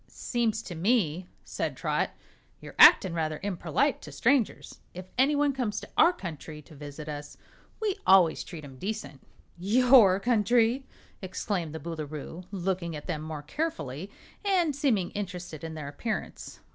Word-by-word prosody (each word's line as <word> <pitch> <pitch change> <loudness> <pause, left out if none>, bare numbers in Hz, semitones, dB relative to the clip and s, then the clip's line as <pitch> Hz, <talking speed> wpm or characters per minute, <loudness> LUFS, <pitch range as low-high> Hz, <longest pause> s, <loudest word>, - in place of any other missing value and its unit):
"Seems 230 -2 -2
to 180 - -7
me," 180 -2 +1 0.2
said - - -4
Trot, - - 0 0.5
"you're - - -11
actin' 185 -3 +8
rather 155 -2 -1
imperlite 175 -6 0
to 150 - -10
strangers. 235 - 0 0.2
If 185 0 -7
anyone 285 +2 +3
comes 225 -6 -2
to - - -11
our 335 - +6
country 160 - -8
to 155 - -16
visit 145 +1 -9
us, 145 -1 -7 0.4
we 420 -3 -1
always 185 -4 +5
treat 160 -4 -9
'em 130 -2 -12
decent." 190 -9 -5 0.4
"Your 220 -1 +6
country!" 235 +3 +2 0.3
exclaimed 185 -3 -3
the - - -4
Boolooroo, 155 +2 -6
looking 185 -3 -2
at 150 - -8
them 155 -4 -3
more 155 -1 -6
carefully 160 - -4 0.3
and 360 -7 +2
seeming 240 -11 +1
interested 180 -6 -6
in 160 -1 -6
their 150 -2 -6
appearance. 215 +10 -5
185 Hz, 145 wpm, -28 LUFS, 155-230 Hz, 0.5 s, actin